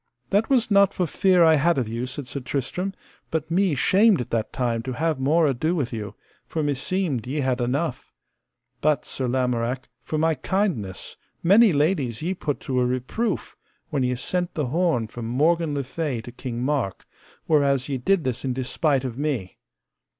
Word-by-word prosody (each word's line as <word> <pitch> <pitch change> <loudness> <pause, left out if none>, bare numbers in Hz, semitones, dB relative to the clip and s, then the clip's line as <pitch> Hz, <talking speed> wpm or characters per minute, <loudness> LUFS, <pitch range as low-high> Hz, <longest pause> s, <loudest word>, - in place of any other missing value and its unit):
That 205 +3 +2
was 250 -5 +2
not 200 -1 +5
for 180 - +1
fear 180 +1 +3
I 160 -1 +6
had 160 +2 +3
of 125 -4 0
you, 115 +3 -3
said 140 +2 -6
Sir 125 +3 -5
Tristram, 145 +9 -3 0.3
but 160 0 -3
me 185 -2 +2
shamed 200 - +4
at 125 - -5
that 115 -2 -1
time 120 -3 -1
to 130 +2 -4
have 155 +1 0
more 155 +5 +3
ado 150 +5 +1
with 135 -7 -2
you, 105 -2 -5 0.3
for 160 - -2
meseemed 145 - -1
ye 145 +3 -1
had 130 -2 0
enough; 130 +4 -2 0.7
but, 150 -1 +2
Sir 130 - -3
Lamorak, 125 0 -1
for 155 - -3
my 160 +1 +3
kindness 135 - -2 0.3
many 205 +5 +6
ladies 145 - 0
ye 180 +3 0
put 150 -6 -3
to 130 -1 -1
a 125 - +3
reproof 130 - -2 0.4
when 145 -3 0
ye 125 0 +1
sent 175 +8 -2
the 150 - 0
horn 160 -3 +1
from 115 +1 -7
Morgan 155 +5 +2
le 140 - -1
Fay 140 -2 -3
to 120 - -10
King 125 -1 -5
Mark, 130 - -1 0.4
whereas 140 -4 +2
ye 135 -3 -2
did 185 +6 +2
this 130 -3 -2
in 130 -2 -1
despite 135 +2 0
of 125 -1 -5
me. 135 - -2
140 Hz, 185 wpm, -24 LUFS, 125-170 Hz, 0.7 s, I